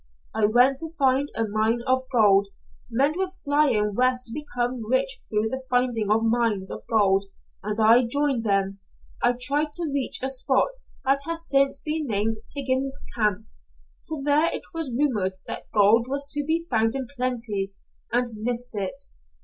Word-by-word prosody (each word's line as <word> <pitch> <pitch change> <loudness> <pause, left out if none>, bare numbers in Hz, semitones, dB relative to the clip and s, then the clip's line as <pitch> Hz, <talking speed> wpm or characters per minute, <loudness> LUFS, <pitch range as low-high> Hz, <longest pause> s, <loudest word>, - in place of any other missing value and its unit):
I 215 - +2
went 250 +5 +4
to 325 - -4
find 270 +1 +2
a 225 - 0
mine 220 +3 0
of 260 0 +2
gold. 200 -5 +4 0.4
Men 270 +6 +2
were 380 -1 0 0.2
flying 285 -8 +2
West 255 +2 +1
to 230 - -3
become 245 -5 -3
rich 260 +1 +1
through 215 +1 0
the 260 +2 -4
finding 245 -4 +1
of 220 +2 +3
mines 225 -4 +1
of - - -6
gold, 195 -3 +3 0.4
and 210 +2 -3
I 230 +3 +5
joined 280 -2 0
them. 195 -2 0 0.4
I 245 +1 +3
tried 290 +4 0
to 330 -2 0
reach 275 -2 +1
a 265 - +1
spot 265 - +2 0.3
that 270 +1 +3
has 335 0 -1
since 275 0 +2
been 310 -1 -2
named 220 0 0 0.2
Higgins' 270 0 -1
Camp, 210 -4 0 0.6
for 310 -3 -5
there 295 +3 +3
it - - -3
was 325 -5 -4
rumored 235 -8 0
that - - -6
gold 215 +3 +4
was 280 +1 -2
to 290 +1 0
be 330 +1 0
found 225 -2 +1
in 270 -1 -2
plenty, 230 -6 -2 0.4
and 245 +1 +2
missed 245 +3 -2
it. 210 +7 -4
245 Hz, 170 wpm, -25 LUFS, 220-275 Hz, 0.6 s, I